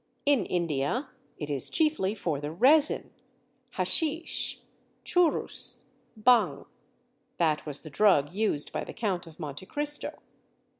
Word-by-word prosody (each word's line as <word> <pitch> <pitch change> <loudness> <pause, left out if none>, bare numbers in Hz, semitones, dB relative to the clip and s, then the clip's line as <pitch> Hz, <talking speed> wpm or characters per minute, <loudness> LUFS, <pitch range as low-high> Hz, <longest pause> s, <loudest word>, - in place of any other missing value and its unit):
In 280 -8 +2
India 170 - -2 0.3
it 150 -1 -5
is 140 -2 0
chiefly 300 - 0
for 160 -8 -3
the 145 +1 -5
resin, 275 - +5 0.6
"haschisch, 325 0 +1 0.5
churrus, 355 -3 0 0.4
bhang." 210 - +3 0.7
(That 155 -2 0
was 145 -1 -6
the 155 - -11
drug 170 -4 +3
used 200 -8 +1
by - - -3
the - - -9
Count 185 -6 -3
of 160 0 -15
Monte 150 +3 -7
Cristo.) 295 0 -2
185 Hz, 120 wpm, -28 LUFS, -, 0.7 s, resin